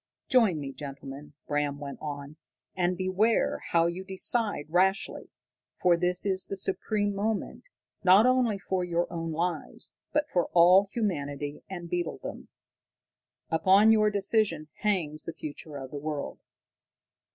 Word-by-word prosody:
"Join 225 - +4
me, 140 -2 -5
gentlemen," 140 +1 -9
Bram 145 -1 -1
went 140 -1 -7
on. 145 0 -6 0.4
"And 180 -1 0
beware 190 +5 +1
how 165 -1 +3
you 170 +2 -2
decide 195 -2 +1
rashly. 190 +5 +1 0.5
For 180 -1 +4
this 180 +2 0
is 190 -1 +1
the 195 - -5
supreme 205 +2 -1
moment, 215 - -3 0.3
not 190 +4 +7
only 255 -4 +3 0.2
of 185 -1 +1
your 170 0 +1
own 165 -1 -3
lives, 170 +3 -3 0.2
but 300 0 +1
for 180 - 0
all 180 +3 +6
humanity 145 - -3
and 175 -3 -6
beetledom. 175 -1 -4 1.0
Upon 190 +7 +5
your 215 -1 +4
decision 200 -6 +1
hangs 170 -8 -1
the 165 - -5
future 150 0 -7
of 135 -1 -8
the 145 - -5
world. 150 -1 -4
180 Hz, 135 wpm, -28 LUFS, 155-200 Hz, 1.0 s, not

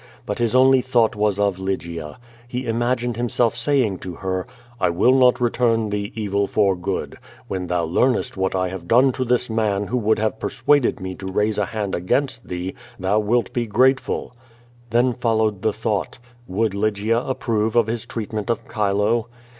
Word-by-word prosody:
But 105 - -3
his 120 0 +1
only 130 0 +6
thought 120 -4 +2
was 105 -1 +1
of 100 -2 +1
Lygia. 85 -5 -4 0.3
He 125 +1 -4
imagined 120 +1 -1
himself 120 -1 +1
saying 115 -5 +1
to 90 -2 -7
her, 95 +2 -3 0.3
"I 90 - +2
will 95 +9 +3
not 125 -2 +5
return 115 -3 +1
thee 100 0 -2
evil 100 -2 0
for 100 -2 +2
good. 90 +1 -4 0.3
When 90 -1 -3
tliou 85 -2 0
loarnest 125 +9 +1
what 95 0 -1
I 95 -1 0
have 90 -2 -7
done 125 +6 +5
to 130 - -2
this 125 0 +1
man 105 -3 0
who 125 - -1
would 110 -2 +2
have 110 0 -1
|>ersuadcd 145 -2 +1
me 95 -1 -5
to 95 +1 -8
raise 105 +2 +1
a 105 - +1
hand 105 -1 -4
against 120 +7 -1
thee, 90 +1 -4 0.3
thou 95 +3 +2
wilt 115 +3 0
bo 120 -1 -1
grateful." 130 +4 +1 0.6
Tlion 120 +2 +2
followed 110 -4 +1
the 110 0 +2
thought. 105 -2 -2 0.3
Would 105 +2 0
Lygia 110 +3 0
ap 130 - -1
prove 110 -1 0
of 120 -2 +5
his 115 0 -4
treatment 110 -1 -4
of 115 - 0
Chilo? 105 +2 +1
110 Hz, 180 wpm, -22 LUFS, 100-120 Hz, 0.6 s, only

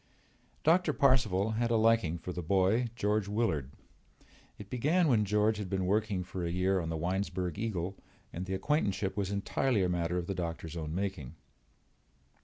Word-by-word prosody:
Doctor 165 0 +4
Parcival 110 -8 +3
had 115 +2 0
a 115 - +2
liking 110 -7 +3
for 90 +2 -6
the 90 - -4
boy, 95 +7 +2
George 105 -2 0
Willard. 100 - 0 0.9
It 105 - -10
began 155 +8 +2
when 110 -6 +3
George 105 +2 +2
had 100 -3 -4
been 95 -1 -1
working 100 -1 0
for 90 0 -5
a 85 - -1
year 95 +2 +1
on 80 -2 -3
the 80 - -2
Winesburg 90 +1 -2
Eagle 95 -4 -2 0.4
and 90 +3 -5
the 95 - -1
acquaintanceship 100 -4 0
was 100 -2 -1
entirely 100 +2 0
a 90 - +1
matter 90 0 0
of 90 - -2
the 100 - -3
doctor's 85 -2 -4
own 80 -1 -4
making. 95 -9 -3
95 Hz, 175 wpm, -31 LUFS, 90-110 Hz, 0.9 s, Doctor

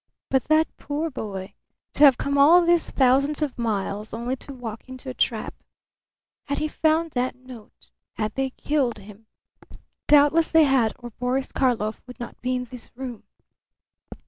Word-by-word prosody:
But 265 -2 +2
that 310 +1 +2
poor 305 +3 -3
boy 200 -5 -6 0.4
to - - +3
have 275 -4 +8
come 280 0 -2
all 325 +5 +6
these 345 0 +2
thousands 275 +3 +2
of 285 -4 -3
miles, 210 -2 -2
only 240 +3 -2
to 280 - -10
walk 240 -2 -8
into 260 0 -7
a - - -8
trap! - - -1 0.9
Had 285 - -2
he 310 - -1
found 320 +1 +1
that 250 -1 -1
note? 240 - -15 0.2
Had 215 0 -3
they 270 0 -1
killed 265 -2 -1
him? 210 +2 -14 0.8
Doubtless 295 +2 +5
they 320 -1 +6
had 265 -6 +3
or 240 -1 -9
Boris 250 +4 -2
Karlov 225 -5 0
would 250 +1 -11
not 240 - -8
be 255 +1 -1
in 250 - -2
this 250 -1 -11
room. 250 -3 -7
255 Hz, 165 wpm, -24 LUFS, 235-290 Hz, 0.9 s, have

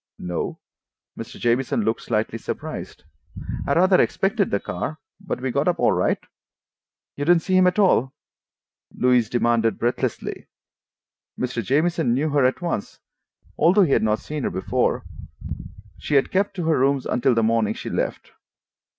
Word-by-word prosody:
"No." 90 -2 -4 0.6
Mr. - - -9
Jamieson 120 -1 +1
looked 110 +2 -1
slightly 110 0 -2
surprised. - - -6 0.6
"I 140 - +2
rather 185 +2 +5
expected 200 +1 +1
the 100 - 0
car, 115 - -4 0.2
but 195 -8 -4
we 130 0 -2
got 140 +5 0
up 175 -1 +2
all - - +3
right." - - +1 1.0
"You 145 - -3
didn't 170 0 +4
see 185 - 0
him 185 0 +5
at 180 - +1
all?" 160 - +3 0.9
Louise 125 -3 +3
demanded 115 -2 +1
breathlessly. 120 +1 -2 0.9
Mr. 125 -2 -2
Jamieson 150 - +1
knew 150 +4 0
her 145 -2 +2
at 130 +7 0
once, 170 -12 -3 0.6
although 180 +6 +5
he 160 - +1
had - - +3
not 110 0 +2
seen 150 +4 -6
her - - -1
before. 95 - -1 0.9
She 150 - -2
had 135 - +3
kept 200 +1 0
to 175 -4 -3
her 160 -3 +2
rooms 135 0 +2
until 125 0 +1
the 115 - +2
morning 110 -1 +1
she - - -6
left. - - -3
135 Hz, 160 wpm, -23 LUFS, 115-175 Hz, 1.0 s, rather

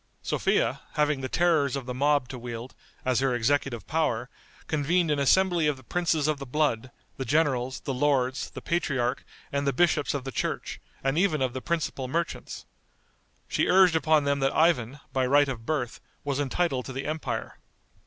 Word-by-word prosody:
Sophia, - - +1
having 150 -2 +1
the 130 - -3
terrors 160 -6 +2
of 135 -3 -4
the 125 - -4
mob 145 0 +2
to 130 -1 -7
wield, 120 +1 -7 0.3
as 130 -1 +2
her 135 -2 +1
executive 120 -1 0
power, 135 -6 -1 0.3
convened 160 +2 +1
an 145 - +1
assembly 175 +3 +3
of 150 -2 0
the 130 - -15
princes 165 0 0
of 155 -2 0
the 140 - -6
blood, 130 -3 0 0.3
the 130 - -2
generals, 130 -4 +1
the 135 - -3
lords, 130 -1 +1
the - - -9
patriarch 130 -8 0 0.3
and 140 0 -1
the - - +4
bishops 150 0 +2
of 140 - -3
the 135 - -5
church, - - -3 0.2
and 135 +4 +1
even 180 -5 +2
of 130 -2 0
the 130 - -4
principal 155 -5 -2
merchants. 165 +5 -3 0.8
She - - +1
urged 185 -2 +6
upon 155 -2 +3
them 140 0 +1
that 135 0 +1
Ivan, 150 -5 +2
by 130 -1 +1
right 145 +2 +5
of 115 -4 -5
birth, 140 -7 -2 0.2
was 140 -1 -1
entitled 140 -1 0
to 130 - -6
the 135 +2 -4
empire. 155 +1 -4
140 Hz, 185 wpm, -27 LUFS, 130-155 Hz, 0.8 s, urged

